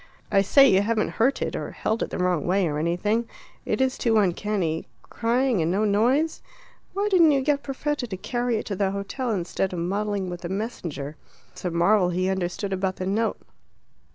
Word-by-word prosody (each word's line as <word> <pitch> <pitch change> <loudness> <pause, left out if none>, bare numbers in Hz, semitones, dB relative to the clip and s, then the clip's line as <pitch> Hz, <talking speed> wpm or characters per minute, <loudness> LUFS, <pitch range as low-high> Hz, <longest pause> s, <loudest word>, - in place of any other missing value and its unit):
"I 195 - +5
say, 275 +8 +6
you 190 -5 +4
haven't 215 +1 0
hurt 260 +5 +2
it, - - -3
or - - -4
held 220 +1 -1
it - - -1
the - - -4
wrong 180 -4 0
way, 185 0 +2
or 150 -1 -2
anything; 205 +8 0 0.4
it - - 0
is 260 0 +1
too 225 -2 +2
uncanny 185 -4 0 0.2
crying 240 -2 0
and 160 - +1
no 200 +4 +1
noise. 250 +10 +2 0.5
Why 400 +2 0
didn't 360 -6 +5
you 275 - +2
get 285 +1 +1
Perfetta 285 -1 -3
to 190 -4 -5
carry 240 +4 -1
it - - -4
to 200 - -3
the 195 0 +1
hotel 200 +6 -3
instead 190 -2 -1
of - - -4
muddling 200 +2 -1
with 175 -1 -6
the 170 - -5
messenger? 170 - -4 0.3
It's - - -11
a - - +1
marvel 180 +3 +3
he 185 +1 0
understood 190 +1 -2
about 190 0 -1
the 185 - -4
note." 215 +4 0
200 Hz, 200 wpm, -25 LUFS, 180-235 Hz, 0.5 s, say